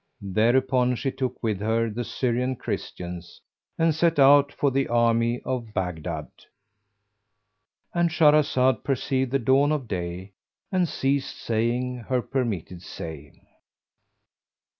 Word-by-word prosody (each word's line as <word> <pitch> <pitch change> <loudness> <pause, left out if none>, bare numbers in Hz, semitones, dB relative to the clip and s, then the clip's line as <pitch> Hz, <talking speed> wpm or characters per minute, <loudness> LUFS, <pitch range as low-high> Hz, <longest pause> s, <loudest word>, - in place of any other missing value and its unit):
Thereupon 125 +3 +3
she 135 +3 -2
took 130 -2 -4
with 110 -4 0
her 115 +2 +1
the 120 +3 -3
Syrian 125 +1 -1
Christians, 90 -6 -6 0.4
and 165 -1 +3
set 165 +2 +1
out 140 +1 +6
for 140 -1 0
the 135 +1 0
army 115 0 +2
of 120 -4 -4
Baghdad.— 85 -4 -3 1.6
And 170 -1 +2
Shahrazad 150 -5 +3
perceived 130 -1 0
the 135 - +1
dawn 135 +4 +3
of 145 -5 -2
day 90 0 -5 0.4
and 180 -3 +1
ceased 135 0 -1
saying 120 +3 -1
her 125 +1 -2
permitted 105 - -3
say. 80 -4 -9
125 Hz, 120 wpm, -25 LUFS, 110-135 Hz, 1.6 s, out